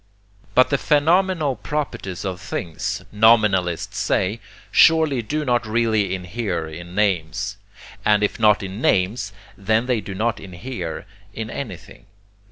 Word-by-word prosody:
But 130 +2 +5
the 140 - +2
phenomenal 160 -1 +2
properties 115 - -4
of 95 -1 -4
things, 85 -4 -4
nominalists 105 -3 +3
say, 95 +2 0 0.3
surely 160 -6 +5
do 150 +7 -3
not 120 -2 +2
really 110 -4 +1
inhere 90 -2 -3
in 85 +3 -9
names, 100 0 0 0.5
and 105 0 +3
if 105 - -1
not 105 -3 +4
in 95 +4 -6
names 100 +2 +1 0.2
then 110 +4 +1
they 125 -4 0
do 95 -1 -7
not 115 +4 -1
inhere 90 -1 -6 0.3
in 110 0 -5
anything. 110 -6 -8
105 Hz, 130 wpm, -22 LUFS, 95-120 Hz, 0.5 s, But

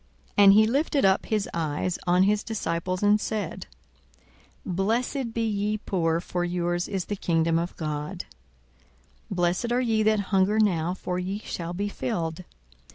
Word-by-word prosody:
42:006:020 205 - +6
And 195 - +9
he 215 +1 +6
lifted 280 +2 +1
up 190 0 +3
his 215 -2 0
eyes 165 +2 -2
on 180 +1 +4
his 205 +2 +2
disciples, 185 -3 -2
and 205 +1 +4
said, 215 -1 -4 1.0
Blessed 230 +7 -1
be 225 0 -1
ye 210 0 -1
poor: 165 -5 0
for 175 0 -3
yours 175 0 -1
is 195 -3 -3
the 205 - -3
kingdom 165 -3 +1
of 170 +1 -4
God. 155 +3 -4 1.0
42:006:021 195 - -4
Blessed 180 +6 0
are 250 - +2
ye 225 -3 +1
that 215 0 +3
hunger 195 +1 +2
now: 180 -5 +2
for 180 -1 -3
ye 190 +2 -3
shall 175 -5 -5
be 200 +3 -2
filled. 165 +1 -3
190 Hz, 160 wpm, -26 LUFS, 175-215 Hz, 1.0 s, And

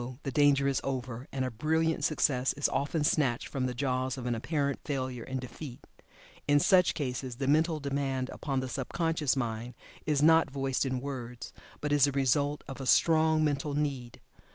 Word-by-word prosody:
the 135 - -3
danger 140 0 +4
is 140 - 0
over, 130 -1 -4
and 130 -1 -1
a 130 - -3
brilliant 160 +5 0
success 135 -4 +1
is 145 - +1
often 145 +3 -1
snatched 135 -5 +1
from 130 -2 -2
the 125 - -3
jaws 130 0 -1
of 125 - -6
an 120 - 0
apparent 140 +3 -1
failure 130 -4 -3
and 130 0 -4
defeat. 130 +1 -9 0.6
In 145 0 +5
such 180 +3 +4
cases 130 -3 -3
the 135 +2 -3
mental 155 +2 +2
demand 135 -2 -2
upon 135 -3 -2
the 130 - -4
sub 130 +1 -4
conscious 165 -5 +1
mind 120 -1 -3 0.3
is 150 -2 +2
not 160 0 +5
voiced 135 0 -1
in 130 -1 -2
words, 125 -3 -6 0.3
but 150 - -2
is 145 -2 +5
the 140 - 0
result 140 +2 +1
of 135 0 -7
a 135 - -5
strong 160 0 +4
mental 145 -1 -1
need. 135 -5 -3
140 Hz, 185 wpm, -30 LUFS, 130-150 Hz, 0.6 s, In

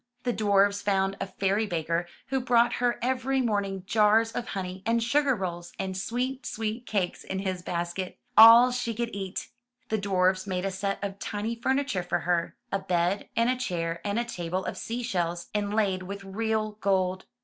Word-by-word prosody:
The 245 - 0
dwarfs 200 -1 +3
found 195 -1 +1
a 195 - -1
fairy 195 +3 0
baker 170 0 -1 0.2
who 265 0 +1
brought 240 -1 +3
her 245 -1 +2
every 260 +1 +1
morning 200 -5 -1
jars 215 +2 +4
of 240 0 -4
honey, 185 -1 -5
and 230 +1 +1
sugar 275 +3 +2
rolls, 175 -4 -5
and 190 -1 -3
sweet, 250 +7 -2
sweet 225 +2 -4
cakes 190 -4 -1
in 190 - -4
his 190 -2 -2
basket 175 +2 -3
— 245 - -43
all 230 +3 +10
she 245 -2 -2
could 235 +1 -3
eat. 195 -2 -5 0.4
The 220 - 0
dwarfs 190 -1 +1
made 185 -1 -2
a 195 - -1
set 195 +1 -2
of 200 0 -4
tiny 210 +3 -3
furniture 265 -3 0
for 175 - -1
her, 175 -1 0 0.2
a 195 - +1
bed 180 +1 0
and 230 +1 +3
a 255 - +2
chair 170 -9 -3
and 205 +1 -1
a 240 - 0
table 180 -4 -3
of - - -3
sea 240 +2 -4
shells, 175 -6 -2
inlaid 205 -2 0
with 200 +2 -7
real 215 +2 -1
gold. 185 -1 +1
200 Hz, 185 wpm, -27 LUFS, 185-230 Hz, 0.4 s, all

